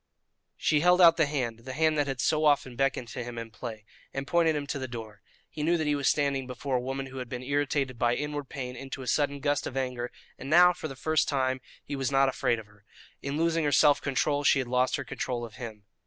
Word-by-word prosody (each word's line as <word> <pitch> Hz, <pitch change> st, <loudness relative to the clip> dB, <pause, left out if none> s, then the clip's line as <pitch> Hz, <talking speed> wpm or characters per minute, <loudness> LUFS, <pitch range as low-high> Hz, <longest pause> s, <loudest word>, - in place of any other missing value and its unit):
She 150 Hz, -, +2 dB
held 180 Hz, +3 st, +4 dB
out 170 Hz, -2 st, +8 dB
the 160 Hz, -3 st, +3 dB
hand 125 Hz, -6 st, -2 dB
the 130 Hz, +3 st, -8 dB
hand 155 Hz, +2 st, +2 dB
that 145 Hz, -, +1 dB
had 135 Hz, -2 st, -3 dB
so 155 Hz, +4 st, +2 dB
often 145 Hz, -4 st, +2 dB
beckoned 135 Hz, -2 st, 0 dB
to 120 Hz, -, -5 dB
him 120 Hz, 0 st, -7 dB
in 115 Hz, -1 st, -6 dB
play 110 Hz, -1 st, -7 dB, 0.3 s
and 135 Hz, 0 st, -2 dB
pointed 165 Hz, 0 st, +2 dB
him 145 Hz, -1 st, -2 dB
to 140 Hz, 0 st, -3 dB
the 130 Hz, -, -4 dB
door. 115 Hz, -4 st, -8 dB, 0.3 s
He 155 Hz, -, -7 dB
knew 170 Hz, +3 st, +2 dB
that 160 Hz, -, -1 dB
he 150 Hz, -, +2 dB
was 140 Hz, -2 st, +2 dB
standing 140 Hz, -3 st, 0 dB
before 130 Hz, +1 st, -3 dB
a -, -, -2 dB
woman 135 Hz, +2 st, -3 dB
who 135 Hz, 0 st, -8 dB
had 125 Hz, -2 st, -6 dB
been 125 Hz, +1 st, -5 dB
irritated 140 Hz, -2 st, -1 dB
by 120 Hz, -1 st, +2 dB
inward 145 Hz, -2 st, -4 dB
pain 125 Hz, -2 st, -5 dB
into 135 Hz, +1 st, -7 dB
a -, -, -9 dB
sudden 145 Hz, +2 st, +1 dB
gust 145 Hz, 0 st, 0 dB
of 135 Hz, -, -6 dB
anger, 125 Hz, -2 st, -2 dB, 0.3 s
and 135 Hz, -, -7 dB
now, 180 Hz, +3 st, +7 dB
for 165 Hz, -, -6 dB
the 135 Hz, -, -8 dB
first 155 Hz, +3 st, +1 dB
time, 130 Hz, -2 st, 0 dB, 0.2 s
he 145 Hz, -, -4 dB
was 135 Hz, -1 st, -1 dB
not 135 Hz, 0 st, +4 dB
afraid 120 Hz, -2 st, 0 dB
of 110 Hz, -, -8 dB
her. 105 Hz, -1 st, -23 dB, 0.4 s
In 140 Hz, +1 st, -3 dB
losing 165 Hz, 0 st, +1 dB
her 145 Hz, -, +1 dB
self 145 Hz, -1 st, +5 dB
control 145 Hz, +1 st, 0 dB
she 145 Hz, -, +5 dB
had 130 Hz, -2 st, -1 dB
lost 125 Hz, +1 st, +2 dB
her 140 Hz, -, -3 dB
control 120 Hz, -1 st, -3 dB
of 110 Hz, 0 st, -12 dB
him. 110 Hz, -5 st, -8 dB
135 Hz, 255 wpm, -28 LUFS, 125-145 Hz, 0.4 s, out